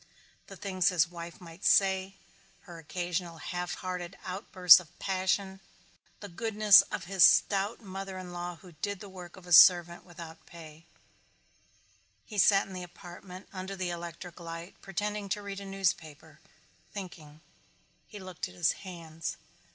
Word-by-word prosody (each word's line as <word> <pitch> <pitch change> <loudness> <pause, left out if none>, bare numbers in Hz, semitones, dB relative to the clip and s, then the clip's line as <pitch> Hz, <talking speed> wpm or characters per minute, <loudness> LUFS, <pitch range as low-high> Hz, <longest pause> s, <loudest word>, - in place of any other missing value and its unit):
The - - -10
things 185 -3 +1
his 170 -3 +2
wife 170 +1 -9
might 170 0 -13
say, 190 0 +3 0.5
her 170 -2 -11
occasional 175 +1 -4
half 175 +3 -4
hearted 180 0 -6
outbursts 185 -2 +6
of 175 -3 -15
passion, 190 0 -1 0.6
the 205 - -7
goodness 210 0 +5
of - - -4
his 190 0 +2
stout 200 +7 +4
mother 195 -1 -7
in 180 -1 -8
law 175 0 -5
who 180 +2 -15
did 195 +5 -4
the 205 - -9
work 180 -2 -11
of 185 - -14
a 175 - -2
servant 175 +1 +7
without 170 -2 -11
pay 160 -1 -13 1.4
He 210 -2 -5
sat 195 +1 +5
in 195 - -11
the 185 - -6
apartment 180 +1 -11
under 190 +1 -6
the 185 -2 -3
electric 170 +1 -8
light 165 +1 -8
pretending 205 +1 -4
to 205 +2 -2
read 200 -1 -6
a 200 - -8
newspaper 160 -5 -3 0.5
thinking. 160 -6 -9 0.7
He 210 - -11
looked 185 -1 -6
at 185 - -15
his 175 -3 +2
hands. 165 -4 -7
180 Hz, 150 wpm, -30 LUFS, 170-195 Hz, 1.4 s, servant